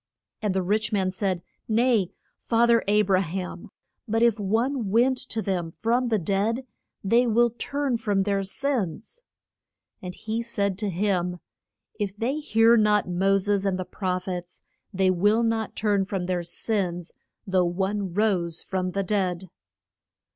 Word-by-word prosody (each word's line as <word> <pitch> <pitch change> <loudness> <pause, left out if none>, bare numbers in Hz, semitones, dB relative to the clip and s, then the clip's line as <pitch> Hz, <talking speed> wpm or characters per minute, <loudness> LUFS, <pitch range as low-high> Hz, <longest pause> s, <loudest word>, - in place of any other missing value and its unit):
And 205 -3 -1
the 190 - +1
rich 210 +4 0
man 190 -3 +1
said, 185 -2 -1 0.2
Nay, 225 -4 +2 0.3
fa 230 0 +2
ther 235 -1 +4
A 210 +1 +4
bra 190 -2 +3
ham; 180 +1 -5 0.4
but 225 +1 +1
if 230 -2 +3
one 225 +3 0
went 245 +5 +3
to 220 -1 -2
them 180 -4 -1
from 240 +8 0
the 225 -2 +2
dead 205 +7 0 0.4
they 235 +5 +3
will 235 +1 +3
turn 275 +2 -2
from 205 -4 0
their 200 0 0
sins. 220 - -3 0.8
And 180 -1 -7
he 220 +1 -3
said 200 -5 -1
to 210 -2 -1
him, 180 -1 -1 0.6
If 205 -1 -3
they 260 +8 -1
hear 230 -5 +4
not 210 -1 +3
Mo 190 +2 +2
ses 200 0 +1
and 195 -2 0
the 185 - -4
proph 185 -1 -3
ets 180 -1 -6 0.3
they 190 -2 +2
will 205 +6 +3
not 225 -1 -1
turn 205 -2 +1
from 190 -2 -3
their 180 0 -1
sins 175 -1 -2 0.3
though 185 -2 +2
one 190 +2 -1
rose 180 -6 +1
from 185 -1 -2
the 195 +1 0
dead. 185 -3 -1
200 Hz, 160 wpm, -25 LUFS, 185-225 Hz, 0.8 s, ther